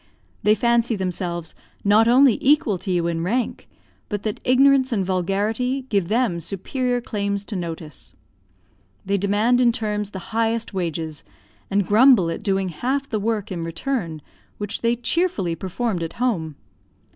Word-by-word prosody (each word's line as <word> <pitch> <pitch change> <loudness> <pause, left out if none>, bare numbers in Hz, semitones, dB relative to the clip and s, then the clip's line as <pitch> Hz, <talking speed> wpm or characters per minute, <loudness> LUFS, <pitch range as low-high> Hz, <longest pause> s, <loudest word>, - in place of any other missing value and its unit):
They 210 +1 +4
fancy 235 +1 +2
themselves 175 -3 -3 0.3
not 210 +3 +5
only 250 -1 +5
equal 265 -9 +3
to 190 - -7
you 175 -2 +1
in 165 -1 -1
rank, 235 +7 -2 0.4
but 205 -2 -3
that 215 -2 -3
ignorance 265 +1 +4
and 200 -5 0
vulgarity 210 +8 -1
give 200 -5 +1
them 220 -4 +1
superior 245 - -2
claims 200 -2 -3
to 210 - -6
notice. 165 -4 -6 0.9
They 200 +1 0
demand 210 +6 +2
in 240 -1 +5
terms 210 -2 -2
the 190 +1 -9
highest 225 0 0
wages, 160 - -3 0.5
and 200 -1 +1
grumble 215 -5 +5
at - - -5
doing 195 -2 0
half 265 - -2
the 215 - 0
work, 210 -1 -2
in 175 -2 -3
return, 165 - -3 0.3
which 205 +1 -4
they 235 0 +2
cheerfully 240 - 0
performed 190 +3 -3
at 165 - -4
home. 175 - -1
205 Hz, 150 wpm, -22 LUFS, 180-240 Hz, 0.9 s, not